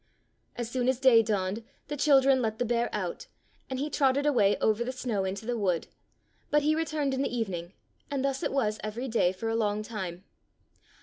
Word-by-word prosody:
As 240 -1 -3
soon 250 +1 0
as 260 -1 +1
day 255 -4 +7
dawned 205 0 -1 0.2
the 295 - -3
children 275 -2 +4
let 220 -2 -1
the 245 - 0
bear 235 0 +1
out, - - -4 0.4
and 260 - -3
he 285 +3 -1
trotted 280 -1 +2
away 215 -9 +3
over 220 +2 +1
the 250 - -3
snow 235 -6 -2
into 195 +3 -4
the 245 +1 -1
wood, 185 -7 0 0.6
but 295 0 +3
he 305 +1 +3
returned 310 -3 -1
in 265 - -1
the - - 0
even 225 -6 -2
ing, 170 +2 -6 0.4
and 275 -1 -1
thus 270 -1 -1
it - - -1
was 215 -6 0
every 220 +5 -4
day 225 -7 +2
for 190 +5 -5
a 225 - 0
longtime. 210 -4 -2
235 Hz, 200 wpm, -29 LUFS, 210-270 Hz, 0.6 s, day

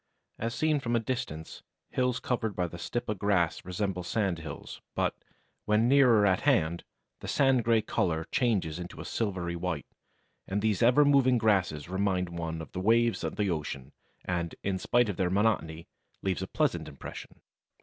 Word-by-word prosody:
"As 115 +1 -2
seen 155 +3 +2
from 120 -3 -1
a - - +4
distance 105 -10 -4 0.3
hills 125 -1 +1
covered 110 -5 -2
by 90 - 0
the 85 0 -7
Stipa 120 +2 -2
grass 95 -5 +1
resemble 90 0 -2
sand 90 -1 -1
hills, 80 - -8
but, - - +1 0.5
when 105 +2 +3
nearer 125 -6 +6
at 95 -2 +3
hand, 85 - +2 0.4
the - - -8
sand 135 -3 +3
grey 115 -1 +3
colour 80 -3 0
changes 95 -10 +1
into 90 0 -8
a - - -6
silvery 90 -6 -2
white, 85 -3 -3 0.6
and 100 +2 -1
these 105 -4 +1
ever 125 +5 +6
moving 135 -3 +5
grasses 95 -10 +1
remind 95 -1 0
one 85 -1 -4
of - - -12
the 90 - -4
waves 115 +3 +3
of - - -3
the 100 -3 0
ocean 70 -4 -4 0.3
and, 85 -2 -2
in 95 -1 -1
spite 120 +4 +2
of 100 - -3
their 95 -2 +1
monotony, 95 -5 0 0.4
leave 95 -3 0
a - - -3
pleasant - - 0
impression." - - -9
100 Hz, 170 wpm, -29 LUFS, 85-115 Hz, 0.6 s, nearer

